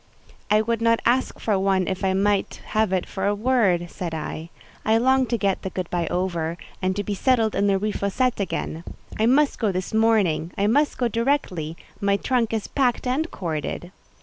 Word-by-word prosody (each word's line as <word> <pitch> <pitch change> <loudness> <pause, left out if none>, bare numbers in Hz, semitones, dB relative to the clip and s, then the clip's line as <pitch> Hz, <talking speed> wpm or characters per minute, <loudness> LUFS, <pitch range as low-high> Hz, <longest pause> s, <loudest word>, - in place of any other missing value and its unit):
"I 210 +1 +4
would 230 0 -1
not 230 0 +3
ask 255 +2 +1
for 205 -4 +1
one 190 -1 +1
if 190 +1 -3
I 190 -1 +2
might 200 +1 +1
have 215 -2 +1
it 185 -2 0
for 195 0 -3
a 205 - +2
word," 205 -7 +1
said 175 -4 -4
I. 160 +1 -5 0.3
"I 220 +1 +3
long 260 +2 +3
to 235 - 0
get 200 -3 0
the 190 - -4
good 185 -2 -4
by 175 -2 0
over, 170 -2 -2 0.2
and 185 0 0
to 205 - -2
be 205 - -3
settled 225 +1 +2
in 200 - +1
the 195 -1 +3
Rue 210 +2 -1
Fossette 230 +5 0
again. 170 -4 -3 0.4
I 220 - +3
must 280 +3 +3
go 215 -4 +1
this 185 +2 -4
morning: 210 -7 +2
I 200 - +1
must 285 +8 +2
go 245 - +1
directly; 230 - -1 0.2
my 200 -1 +2
trunk 240 0 0
is 220 -2 -2
packed 255 -4 0
and 280 +6 0
corded." 170 0 -4
205 Hz, 200 wpm, -24 LUFS, 185-230 Hz, 0.4 s, I